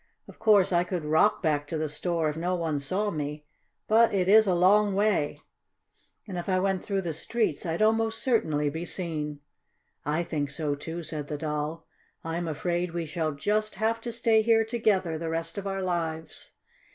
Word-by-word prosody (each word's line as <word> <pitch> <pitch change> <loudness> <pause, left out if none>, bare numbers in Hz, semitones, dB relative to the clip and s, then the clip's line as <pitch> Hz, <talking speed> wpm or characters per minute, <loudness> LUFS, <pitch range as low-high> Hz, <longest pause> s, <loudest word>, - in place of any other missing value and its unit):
"Of - - -14
course 200 -3 +4
I 175 0 +4
could 180 -3 -4
rock 160 +8 +3
back 145 -3 +1
to 160 - -3
the 155 0 -1
store 165 +2 -1
if 150 - -2
no 175 +3 -1
one 160 -4 -1
saw 190 +9 -1
me, 150 -1 -4 0.4
but 225 +2 +5
it 185 -2 +1
is 215 +2 +6
a 185 - +3
long 200 +3 +4
way, 200 -8 +1 0.8
and 185 -3 -4
if 175 - -5
I 185 - +3
went 190 0 0
through 195 -2 -1
the 170 -2 -2
streets 185 0 -1
I'd 165 +6 0
almost 225 +1 +2
certainly 155 - +1
be 160 +3 -4
seen." 155 -5 -4 0.6
"I 155 +4 0
think 150 -4 -2
so, 145 +1 -1
too," 165 +4 -6
said 150 -2 -4
the 150 - -4
Doll. 150 +1 -3 0.4
"I'm 165 +1 -3
afraid 170 +2 -2
we 170 -1 -2
shall 155 0 -2
just 215 +9 -1
have 225 +3 0
to 235 - -4
stay 230 -1 +3
here 225 0 +3
together 200 -8 0
the 165 0 -3
rest 165 +3 -3
of 200 - -5
our 195 -1 -2
lives." 165 -3 -3
175 Hz, 190 wpm, -27 LUFS, 155-205 Hz, 0.8 s, is